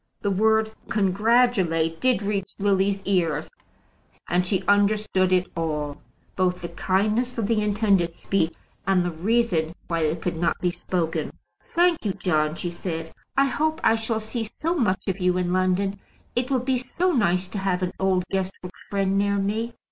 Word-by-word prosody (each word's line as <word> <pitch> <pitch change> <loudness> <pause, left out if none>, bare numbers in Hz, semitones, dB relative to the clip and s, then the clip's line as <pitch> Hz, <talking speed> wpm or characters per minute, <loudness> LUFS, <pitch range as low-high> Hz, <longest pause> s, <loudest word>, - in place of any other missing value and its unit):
The 200 - 0
word 220 +2 +3 0.2
"congratulate" 195 -6 +2
did 255 -5 +2
reach 200 -2 -2
Lily's 195 0 +1
ears, 165 -6 +1 0.8
and 180 +1 +1
she 190 -1 0
understood 205 -2 +3
it 185 0 +3
all; 150 -3 -3 0.3
both 180 -1 +1
the 170 - -3
kindness 215 +8 0
of 225 - 0
the 220 0 +1
intended 200 -5 +2
speech 170 -3 0 0.4
and 185 -2 +3
the 175 - -1
reason 175 -2 +1
why 165 -1 -1
it 160 +1 0
could 175 -1 -3
not 170 +1 +1
be 180 - +1
spoken. 170 -2 -2 0.4
"Thank 345 -1 +2
you, 200 -3 0
John," 155 -5 0
she 175 0 -4
said; 165 -2 -5 0.3
"I 275 - +5
hope 310 +3 0
I 225 - +5
shall 225 0 -1
see 220 +2 -4
so 305 +10 -2
much 220 - 0
of 190 0 -1
you 180 0 +2
in 180 -1 0
London. 185 +2 +1 0.4
It 245 +2 0
will 260 -3 +1
be 260 -1 +1
so 340 +9 0
nice 185 - +1
to 200 - -4
have 190 -1 0
an 180 - -2
old 190 -1 +2
Guestwick 185 -1 -3 0.2
friend 195 -1 +1
near 200 0 +1
me." 220 +4 -1
195 Hz, 170 wpm, -24 LUFS, 180-220 Hz, 0.8 s, I